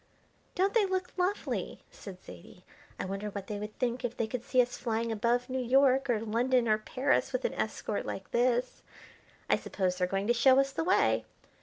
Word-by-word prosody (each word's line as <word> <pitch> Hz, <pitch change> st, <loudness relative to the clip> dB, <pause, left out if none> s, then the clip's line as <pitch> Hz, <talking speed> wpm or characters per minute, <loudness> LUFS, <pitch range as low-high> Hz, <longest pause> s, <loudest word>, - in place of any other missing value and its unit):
"Don't 385 Hz, +2 st, +2 dB
they 430 Hz, -4 st, +3 dB
look 375 Hz, -1 st, -2 dB
lovely!" 370 Hz, +3 st, -2 dB
said 190 Hz, -3 st, -10 dB
Zaidie. 85 Hz, -1 st, -13 dB, 0.4 s
"I -, -, -2 dB
wonder 195 Hz, +2 st, -4 dB
what 200 Hz, -1 st, -6 dB
they 205 Hz, 0 st, -5 dB
would 210 Hz, +1 st, -7 dB
think 245 Hz, 0 st, -1 dB
if 245 Hz, -1 st, -3 dB
they 230 Hz, -, 0 dB
could 235 Hz, +2 st, -5 dB
see 255 Hz, -, 0 dB
us 245 Hz, 0 st, +3 dB
flying 230 Hz, -1 st, -2 dB
above 235 Hz, +3 st, 0 dB
New 260 Hz, 0 st, -2 dB
York 265 Hz, +1 st, +3 dB
or 230 Hz, -3 st, +2 dB
London 235 Hz, +2 st, +1 dB
or 215 Hz, 0 st, +3 dB
Paris 255 Hz, +5 st, 0 dB
with -, -, -2 dB
an -, -, 0 dB
escort -, -, -3 dB
like -, -, -6 dB
this. 245 Hz, +1 st, +1 dB, 0.7 s
I -, -, +3 dB
suppose 185 Hz, -2 st, -2 dB
they're 180 Hz, -, +2 dB
going 195 Hz, +2 st, -1 dB
to 240 Hz, -, +3 dB
show 260 Hz, +3 st, +5 dB
us 275 Hz, 0 st, +2 dB
the 325 Hz, -, -2 dB
way. 370 Hz, +3 st, +2 dB
240 Hz, 200 wpm, -30 LUFS, 215-265 Hz, 0.7 s, show